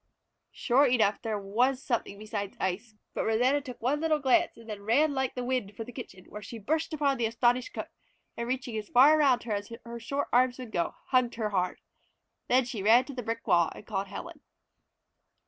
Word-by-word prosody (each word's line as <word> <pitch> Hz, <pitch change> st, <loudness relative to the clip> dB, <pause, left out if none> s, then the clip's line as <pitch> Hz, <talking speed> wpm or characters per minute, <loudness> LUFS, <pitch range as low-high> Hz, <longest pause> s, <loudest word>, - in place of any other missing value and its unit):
Sure 270 Hz, +4 st, +3 dB
enough 220 Hz, -5 st, +2 dB
there 220 Hz, -2 st, -2 dB
was 245 Hz, +7 st, 0 dB
something 230 Hz, -5 st, -2 dB
besides 205 Hz, -1 st, -5 dB
ice, 200 Hz, +5 st, -3 dB, 0.2 s
but -, -, -1 dB
Rosanna 250 Hz, +6 st, +2 dB
took 255 Hz, -4 st, -9 dB
one 275 Hz, +4 st, +1 dB
little 320 Hz, -1 st, +2 dB
glance 265 Hz, -3 st, +2 dB
and 230 Hz, -1 st, -14 dB
then 210 Hz, -2 st, -6 dB
ran 280 Hz, +9 st, +3 dB
like 265 Hz, -2 st, -1 dB
the 250 Hz, -, -3 dB
wind 245 Hz, -5 st, -2 dB
for 225 Hz, -, -4 dB
the 245 Hz, -, -10 dB
kitchen, 190 Hz, -7 st, -10 dB
where 210 Hz, -, -9 dB
she 230 Hz, -, -8 dB
burst 315 Hz, +10 st, -1 dB
upon 285 Hz, -3 st, +1 dB
the 230 Hz, -, +2 dB
astonished 240 Hz, +2 st, +1 dB
cook, -, -, -6 dB, 0.5 s
and 235 Hz, -, -4 dB
reaching 250 Hz, -2 st, -3 dB
as 210 Hz, -1 st, -6 dB
far 285 Hz, +5 st, +6 dB
around 265 Hz, -5 st, +4 dB
her 235 Hz, -, -6 dB
as 205 Hz, +1 st, -4 dB
her 235 Hz, 0 st, -7 dB
short 280 Hz, +5 st, -2 dB
arms 245 Hz, 0 st, +4 dB
would 250 Hz, -4 st, -8 dB
go, 170 Hz, -4 st, -1 dB
hugged 255 Hz, -2 st, +2 dB
her 220 Hz, -2 st, -2 dB
hard. 180 Hz, -2 st, -1 dB, 0.7 s
Then 255 Hz, 0 st, +3 dB
she 235 Hz, -4 st, -5 dB
ran 230 Hz, +5 st, +5 dB
to 280 Hz, -, -8 dB
the 250 Hz, -, -4 dB
brick 230 Hz, 0 st, -4 dB
wall 170 Hz, -1 st, +3 dB
and -, -, -12 dB
called 200 Hz, -2 st, -3 dB
Helen. 195 Hz, -, -8 dB
240 Hz, 210 wpm, -29 LUFS, 215-260 Hz, 0.7 s, far